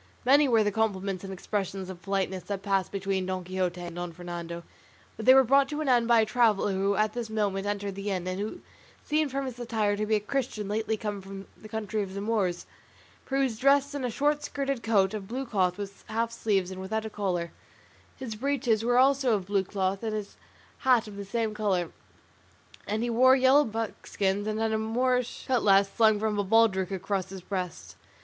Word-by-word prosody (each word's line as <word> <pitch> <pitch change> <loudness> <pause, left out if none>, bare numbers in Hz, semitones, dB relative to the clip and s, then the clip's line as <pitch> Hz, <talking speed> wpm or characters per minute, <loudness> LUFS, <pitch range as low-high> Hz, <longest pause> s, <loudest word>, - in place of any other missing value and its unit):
Many 285 +3 +6
were 225 -3 +4
the 205 - +1
compliments 195 -3 -1
and 195 - -6
expressions 195 0 -3
of 185 -2 -9
politeness 190 0 -1
that 200 -1 -4
passed 195 -2 0
between 195 -1 -2
Don 185 -1 -3
Quixote 180 -1 -2
and 175 -1 -7
Don 175 0 -4
Fernando; 170 0 -7 0.5
but 220 - -7
they 260 - +9
were 265 - +7
brought 275 +2 +4
to 295 - -3
an 310 - -2
end 240 -3 +3
by 235 -1 +5
a - - +2
traveller 215 -3 +2
who 195 +1 +1
at 215 +1 +1
this 240 -2 -4
moment 205 -2 -1
entered 205 -1 -2
the 200 +2 -4
inn, 185 -3 -2
and 185 +1 -3
who 220 - -4 0.4
seemed 305 -1 +1
from 275 +1 -2
his 250 -2 -6
attire 220 -4 0
to 210 +1 -2
be 220 - +3
a - - +2
Christian 215 -2 -3
lately 220 +1 -1
come 205 -2 -4
from 195 +1 -9
the 215 - -13
country 215 -1 -2
of 195 -1 -5
the - - -3
Moors, 200 -5 -1 0.6
for 270 - -3
he 275 - +3
was 230 -5 -2
dressed 280 +1 +3
in 285 -2 -4
a 250 - 0
short 295 +5 0
skirted 275 -3 -2
coat 200 -4 +2
of 205 -3 -5
blue 260 +5 -4
cloth 185 -6 0
with 200 -1 -7
half 230 +1 -1
sleeves 200 -5 0
and 190 0 -7
without 220 +3 -3
a - - -4
collar; 180 -5 -2 0.7
his 255 -4 -5
breeches 240 -2 0
were 245 +1 +2
also 265 -2 +4
of 195 -3 -3
blue 200 0 +1
cloth, 190 0 -2
and 220 -2 -2
his 210 -2 -6 0.5
cap 250 -4 +4
of 210 -2 -10
the 200 - -5
same 220 +2 -2
colour, 195 -5 0 1.0
and 215 +3 -1
he 240 - -1
wore 260 +3 +6
yellow 265 +2 +5
buskins 205 -2 -2
and 215 0 -1
had 225 0 0
a 220 - 0
Moorish 250 +2 0
cutlass 200 -6 +4
slung 220 -2 +4
from 215 -1 -1
a - - +2
baldric 195 -3 +3
across 195 0 -2
his 190 -1 -8
breast. 180 - -5
210 Hz, 215 wpm, -28 LUFS, 195-235 Hz, 1.0 s, they